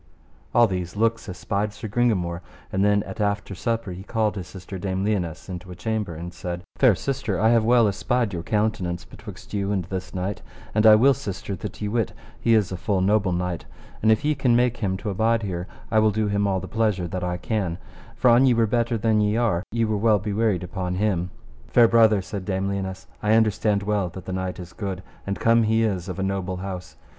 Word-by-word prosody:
All 120 -1 +7
these 90 -4 -3
looks 115 0 0
espied 100 +3 -2
Sir 110 - -7
Gringamore, 100 -7 0 0.3
and 95 - +2
then 105 0 +3
at 110 - -6
after 100 -1 -1
supper 115 +1 -2
he 90 +1 -7
called 110 +1 -1
his 95 -3 -5
sister 95 0 -8
Dame 95 0 -2
Lionesse 90 -7 -2
into 90 0 -7
a 90 - -7
chamber, 105 -3 -2
and 85 +2 -7
said: 90 0 -5
Fair 125 -7 +5
sister, 120 -5 -2
I 110 +2 +4
have 115 -1 +4
well 120 0 +5
espied 115 +2 0
your 85 - -3
countenance 105 -4 -1
betwixt - - -12
you 100 -1 -1
and 95 -4 -1
this 95 +1 -5
knight, 95 +2 -3 0.3
and 110 +1 +4
I 110 - +10
will, 135 +6 +5
sister, 100 -3 -5
that 105 - -7
ye - - 0
wit 115 0 -1 0.3
he 115 - +3
is 105 -4 +2
a 95 - -3
full 95 0 0
noble 100 0 +2
knight, 90 -1 -2 0.4
and 110 - +4
if 110 +6 +2
ye 150 - +3
can 135 -4 +2
make 125 0 +2
him 95 -3 -1
to 105 +1 -4
abide 115 +3 +1
here 90 -2 -3 0.2
I 110 - +4
will 110 0 +4
do 110 +1 0
him 100 0 +1
all 95 -1 +1
the - - -7
pleasure 105 -5 0
that 90 +1 -4
I 90 0 -1
can, 90 -2 -2 0.4
for 120 +2 +4
an 130 +2 +5
ye 125 - +4
were 115 0 +3
better 115 +1 0
than 110 0 +2
ye 105 +1 +1
are, 110 -8 +1
ye 115 +1 +1
were 110 -1 0
well 110 0 +4
bywaryd 105 -2 0
upon 90 0 -3
him. 90 -3 0 0.4
Fair 120 -1 +6
brother, 110 -4 +4
said 100 0 -5
Dame 95 0 -1
Lionesse, 95 -1 -4 0.2
I 105 +1 +2
understand 105 -2 +2
well 100 -3 0
that 90 +1 -10
the 95 - -4
knight 95 0 -3
is 90 -1 -9
good, 95 -3 -5 0.2
and 100 - -2
come 115 0 +4
he 110 +1 +2
is 95 -4 -1
of 90 - -5
a 95 - -1
noble 95 -1 -2
house. 90 -1 -6
100 Hz, 225 wpm, -24 LUFS, 95-110 Hz, 0.4 s, I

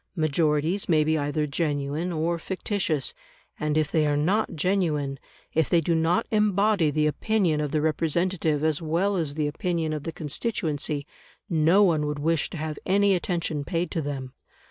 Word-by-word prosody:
Majorities 155 +3 +1
may 155 -2 +4
be 155 +1 +1
either 150 0 0
genuine 150 +2 -2
or 170 +1 -1
fictitious, 185 -5 -2 0.5
and 150 0 0
if 155 -2 +1
they 155 -2 +2
are 145 0 +1
not 185 +5 +1
genuine, 155 -6 0 0.3
if 160 -2 +1
they 170 - +4
do 165 +1 0
not 165 +7 +2
embody 210 -4 +3
the 150 +1 +1
opinion 170 -1 +1
of 150 - -1
the 155 +1 0
representative 160 0 0
as 155 0 +1
well 170 +6 0
as 155 -5 -1
the 155 -1 0
opinion 160 +1 -1
of 150 - -3
the 165 - -5
constituency, 150 - -2 0.5
no 165 +5 +4
one 155 -6 +2
would 150 0 -2
wish 160 +1 0
to - - -7
have 155 -1 -4
any 200 +1 +3
attention 170 -5 -1
paid 170 +3 -2
to 165 - -1
them. 135 -3 -5
160 Hz, 170 wpm, -26 LUFS, 150-180 Hz, 0.5 s, may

